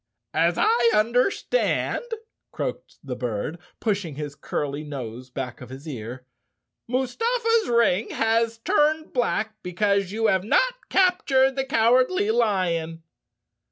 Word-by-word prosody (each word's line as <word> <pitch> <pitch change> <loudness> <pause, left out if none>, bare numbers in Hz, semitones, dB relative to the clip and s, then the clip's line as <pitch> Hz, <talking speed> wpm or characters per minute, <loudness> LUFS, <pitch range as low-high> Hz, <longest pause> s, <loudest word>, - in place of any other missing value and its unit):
"As 170 +2 +2
I 235 0 +4
understand," 245 - +1 0.5
croaked - - -5
the 130 -3 -5
bird, 125 +6 -3 0.2
pushing 200 -9 -1
his 145 -1 -5
curly 145 +1 -4
nose 130 -4 -7
back 125 -1 -6
of 125 - -9
his 135 +4 -10
ear, 125 -2 -7 0.6
"Mustafa's 455 - +1
ring 230 -4 +2
has 225 0 +1
turned 305 +6 +1
black 220 -3 -1
be¬ 180 -1 -8
cause 200 -2 +2
you 225 +2 -1
have 190 -4 +3
not - - +1
captured 275 -8 +3
the 270 -1 -1
Cowardly 255 - +3
Lion?" 170 - 0
215 Hz, 125 wpm, -24 LUFS, -, 0.6 s, I